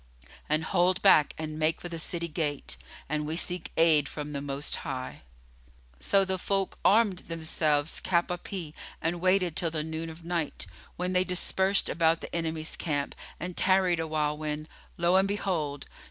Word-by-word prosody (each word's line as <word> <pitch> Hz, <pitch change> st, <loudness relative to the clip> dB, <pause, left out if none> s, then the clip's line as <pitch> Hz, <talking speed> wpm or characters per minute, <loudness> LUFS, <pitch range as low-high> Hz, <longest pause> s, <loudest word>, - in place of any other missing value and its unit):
and 155 Hz, +1 st, +2 dB
hold 180 Hz, +1 st, +2 dB
back 155 Hz, -7 st, +6 dB
and 155 Hz, -1 st, -5 dB
make 155 Hz, +1 st, +1 dB
for -, -, -6 dB
the 170 Hz, -1 st, -5 dB
city 170 Hz, +1 st, -1 dB
gate; 150 Hz, -3 st, -2 dB, 0.3 s
and 150 Hz, +1 st, -2 dB
we 155 Hz, -, -1 dB
seek 180 Hz, 0 st, -1 dB
aid 155 Hz, -4 st, +5 dB
from 150 Hz, 0 st, -6 dB
the 140 Hz, -, -3 dB
Most 140 Hz, +1 st, -2 dB
High." 130 Hz, -1 st, -5 dB, 0.8 s
So 195 Hz, -, +3 dB
the 190 Hz, 0 st, -1 dB
folk 195 Hz, 0 st, -1 dB
armed 205 Hz, -3 st, +4 dB
themselves 160 Hz, -2 st, +1 dB
cap 175 Hz, -1 st, +1 dB
à 180 Hz, 0 st, -4 dB
pie 175 Hz, -7 st, -6 dB, 0.3 s
and 170 Hz, +1 st, -2 dB
waited 185 Hz, -2 st, +2 dB
till 170 Hz, -, +1 dB
the 155 Hz, -1 st, -2 dB
noon 160 Hz, +1 st, -4 dB
of 165 Hz, +1 st, -11 dB
night, 170 Hz, -3 st, -2 dB, 0.3 s
when 180 Hz, +1 st, -2 dB
they 180 Hz, 0 st, +4 dB
dispersed 190 Hz, +2 st, +2 dB
about 165 Hz, 0 st, +2 dB
the -, -, -7 dB
enemy's 160 Hz, -1 st, -2 dB
camp 145 Hz, -4 st, -2 dB, 0.3 s
and 180 Hz, +2 st, -5 dB
tarried 185 Hz, -2 st, +3 dB
awhile 155 Hz, -2 st, 0 dB
when, 155 Hz, 0 st, -4 dB, 0.3 s
lo 175 Hz, +2 st, +4 dB
and 190 Hz, +1 st, +4 dB
behold! 170 Hz, -8 st, -2 dB
165 Hz, 170 wpm, -28 LUFS, 155-180 Hz, 0.8 s, back